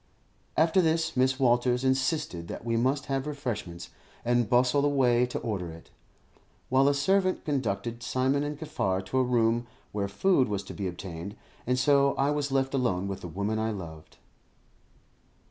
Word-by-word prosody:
After 165 +4 +4
this, 160 -1 +1
Mrs. 130 +1 +1
Walters 125 0 +2
insisted 130 - 0
that - - -7
we 115 -1 0
must 130 +4 +1
have 135 +1 -2
refreshments, 115 - -5 0.3
and 120 -2 +2
bustled 125 +3 +3
away 125 -4 +3
to 125 - -4
order 95 -6 -3
it, 80 0 -12 0.8
while 135 +2 +4
a 145 - +4
servant 185 +6 +1
conducted 120 -4 -2
Simon 130 +3 0
and 145 0 -4
Kaffar 95 - -2
to 130 +7 0
a - - +4
room 120 -1 +1 0.2
where 100 -1 -2
food 130 - +2
was 100 -1 -2
to - - -9
be 100 - -3
obtained; 90 +1 -7 0.3
and 125 0 +2
so 140 +1 +3
I 140 +2 +1
was 145 -1 -1
left 135 0 +1
alone 110 -8 0
with 95 -1 -5
the - - -6
woman 100 +6 -2
I 110 0 0
loved. 80 -6 -8
125 Hz, 165 wpm, -28 LUFS, 100-140 Hz, 0.8 s, After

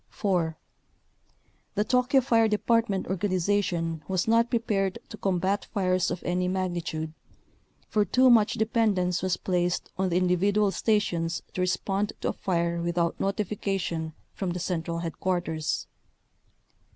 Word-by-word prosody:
4. 175 -6 -1 1.2
The 210 - +2
Tokyo 250 +4 +3
fire 230 -3 +3
department 215 -2 +1
organization 180 -3 0
was 185 0 0
not 230 +1 +4
prepared 200 -5 0
to 215 - -8
combat 195 +1 0
fires 185 -3 +1
of 175 - -4
any 180 +1 0
magni 185 -2 -1
tude, 160 -1 -4 0.7
for 210 - +2
too 255 +7 +4
much 220 -3 +5
dependence 210 -5 +1
was 185 -1 0
placed 180 -1 -1
on 190 -1 +2
the 175 - +1
individual 195 +3 +2
stations 175 -5 0
to 185 - -2
respond 195 +3 0
to - - 0
a - - -1
fire 170 -2 -1
with 170 +1 -2
out 170 -1 +1
notification 195 -5 -2 0.2
from 190 - -3
the 180 - -4
central 170 -2 -2
headquarters. 170 -1 -2
185 Hz, 135 wpm, -27 LUFS, 175-210 Hz, 1.2 s, much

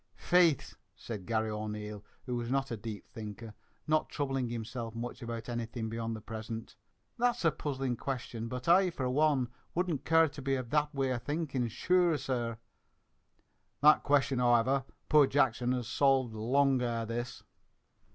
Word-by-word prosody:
"Faith!" 175 -6 +3 0.2
said 105 -6 -7
Garry 110 -1 0
O'Neil, 105 -1 -5 0.2
who 125 -2 -2
was 120 -1 -3
not 135 0 0
a - - -1
deep 110 -1 -7
thinker, 110 0 -8 0.3
not 155 0 +1
troubling 135 -4 -1
himself 115 0 -5
much 120 +3 -5
about 115 -1 -5
anything 120 -1 -3
beyond 115 0 -3
the 110 - -8
present. 110 +1 -6 0.4
"That's 240 -6 +1
a 165 - +5
puzzling 135 -5 -2
question; 120 -4 -4
but 125 +4 -6
I, 180 +2 +6
for 135 -6 -3
one, 140 -3 +2 0.3
wouldn't 175 -4 0
care 160 0 +5
to 145 -1 -9
be 135 0 0
of 125 -3 -5
that 150 -1 +2
way 135 -1 +1
of 120 -2 -2
thinkin', 145 -5 -1
sure, 175 +7 +2
sir." 120 -4 -2 1.2
"That 150 +1 +7
question 140 -2 +2
however, 125 +2 +3 0.2
poor 150 -3 +6
Jackson 125 -3 +2
has 125 -3 -2
solved, 130 -2 +2
long 130 +4 +2
ere 115 -2 -1
this!" 120 +2 -5
125 Hz, 160 wpm, -32 LUFS, 115-140 Hz, 1.2 s, That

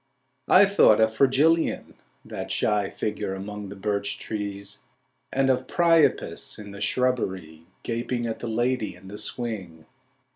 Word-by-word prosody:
I 195 +2 +7
thought 195 - +5
of 110 0 +3
Fragilion, 145 +6 +2 0.3
that - - -6
shy 105 -2 +1
figure 105 -2 -3
among 105 +1 -7
the 100 - -8
birch 100 0 -2
trees, 105 -1 -5 0.5
And 135 0 +2
of 130 0 -1
Priapus 165 -3 +2
in 105 -1 -9
the 100 0 -10
shrubbery 95 -10 -1 0.2
Gaping 120 +1 -2
at 115 -1 -4
the 120 - -5
lady 120 -3 -1
in 95 +1 -14
the 105 +1 -8
swing. 95 -10 -5
110 Hz, 140 wpm, -25 LUFS, 100-125 Hz, 0.5 s, I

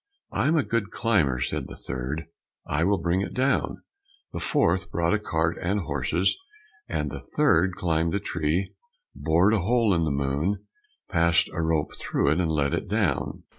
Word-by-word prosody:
"I'm 155 +4 +2
a 155 - +3
good 115 -4 -1
climber," 85 - +1
said 60 - -2
the - - -9
third, 65 +5 -4 0.4
"I 75 +3 0
will 100 +3 +3
bring 90 +2 0
it 100 - -4
down." 135 +2 0 0.5
The - - -3
fourth 95 - +1
brought 85 0 +1
a 105 - +2
cart 80 -4 -1
and 100 +4 0
horses, 80 +3 0 0.5
and - - -2
the - - -5 0.2
third 95 - +4
climbed 80 -1 0
the 100 - 0
tree, 85 -1 -1 0.4
bored 85 +6 +3
a 110 - +3
hole 115 +2 +2
in 85 -2 +2
the - - 0
moon, 70 +8 -1 0.4
passed 85 -2 +3
a 85 - -1
rope 80 -2 0
through 70 - 0
it, 80 - +1
and 85 -3 +1
let 70 -3 +1
it - - -2
down. - - -1
85 Hz, 175 wpm, -26 LUFS, 80-100 Hz, 0.5 s, third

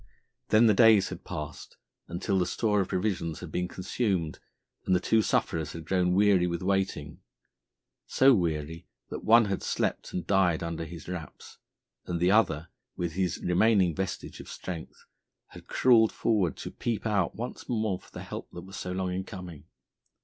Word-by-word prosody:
Then 110 +2 +6
the 110 - +6
days 110 -2 +6
had 90 0 -8
passed 75 -4 -7 0.3
until 95 +3 -1
the 90 - +1
store 105 -3 +1
of 95 - -2
provisions 90 -5 -2
had - - -8
been 90 0 -1
consumed 95 -3 -2 0.5
and 95 - +4
the - - +3
two 110 +4 +3
sufferers 80 -6 0
had 80 -1 -8
grown 90 0 +1
weary 100 -3 +4
with 85 0 -3
waiting, 95 -7 -1 0.9
so 135 0 +5
weary 80 -4 -2 0.2
that - - -5
one 115 +1 +6
had 100 -2 -2
slept - - -2
and 90 - -4
died 90 -4 +2
under 85 0 -4
his 85 0 -10
wraps, 85 -5 -8 0.5
and 85 -1 -2
the 90 +2 +3
other, 85 -7 +2 0.3
with 85 -1 -2
his 90 0 -1
remaining 95 -1 +3
vestige 95 +2 -4
of - - -10
strength, 85 -3 -8 0.4
had - - -13
crawled 115 -4 +4
forward 100 -9 0
to - - -6
peep 115 -2 -3
out 100 -5 +1
once 120 +3 -6
more 110 -6 0
for - - -19
the - - -8
help - - -7
that 85 - -7
was 95 +1 -10
so 90 - -4
long 90 0 -2
in 95 +1 -2
coming. 90 -7 -9
90 Hz, 175 wpm, -28 LUFS, 85-105 Hz, 0.9 s, Then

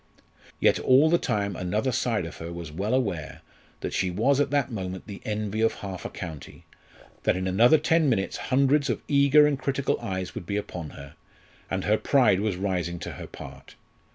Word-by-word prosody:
Yet - - +3
all 140 +5 +5
the 170 - +4
time 100 -2 -1
another 105 +9 -1
side 115 -6 0
of 80 - -8
her 85 +1 -7
was 85 -2 -7
well 100 +10 -1
aware 100 - -2 0.4
that - - -4
she 95 - 0
was 120 +10 +2
at 145 -1 +2
that 140 -2 0
moment 95 -4 -5
the 100 -3 -9
envy 105 0 -2
of 115 - +2
half 95 -3 -7
a - - -3
county, 80 -5 -9 0.6
that - - +1
in 95 0 -2
another 115 +11 +5
ten 155 0 +2
minutes 100 -6 0
hundreds 140 +2 +3
of - - -2
eager 140 +1 +5
and 145 -2 +1
critical 140 0 -1
eyes 95 -1 -4
would 85 - -7
be 100 - -1
upon 90 -6 -5
her; 70 0 -10 0.6
and 95 -1 -2
her 105 +1 +2
pride 125 -9 +3
was 105 -2 -1
rising 90 -3 -2
to - - -6
her - - -8
part. - - -11
105 Hz, 195 wpm, -26 LUFS, 90-135 Hz, 0.6 s, all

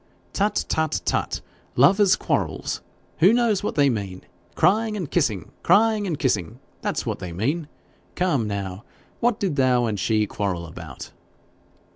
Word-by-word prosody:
'Tut, 205 +1 +1
tut, 160 -1 0
tut! - - -1 0.3
Lovers' 190 - +5
quarrels! - - -2 0.4
Who 180 +6 +7
knows 230 -4 +3
not 205 - -3
what - - -3
they 145 -1 +4
mean? 100 -7 -3 0.3
Crying 215 +5 +2
and 175 -8 -5
kissing 110 - 0
crying 215 -1 +3
and 165 -5 -2
kissing 115 - -1 0.2
that's - - -2
what - - -3
they 90 - -6
mean. 140 - -1 0.5
Come 145 -11 +1
now 100 0 -4 0.4
what 240 -2 +1
did 180 -8 -1
thou 125 -2 +3
and 105 -3 -2
she 110 +2 +2
quarrel 95 -4 -3
about?' 80 - -9
140 Hz, 150 wpm, -24 LUFS, -, 0.5 s, Who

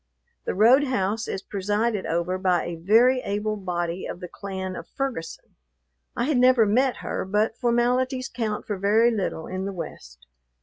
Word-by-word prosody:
The - - -2
roadhouse 225 -2 +3
is 195 - -4
presided 205 +1 -1
over 170 +3 -1
by 185 -2 +1
a 175 - -4
very 225 +10 +4
able 210 -1 -2
body 175 -2 -3
of - - -6
the 180 - -7
clan 190 -1 -6
of - - -8
Ferguson. 260 -12 -5 0.6
I - - +1
had 270 -1 +1
never 250 -2 +5
met 250 +5 +2
her, - - -2
but 210 +4 0
formalities 250 +2 +1
count 220 -3 -3
for 205 - -3
very 220 +4 +4
little 195 -7 -2
in 185 +1 -4
the 200 - -4
West. 65 - -9
210 Hz, 165 wpm, -25 LUFS, 185-240 Hz, 0.6 s, never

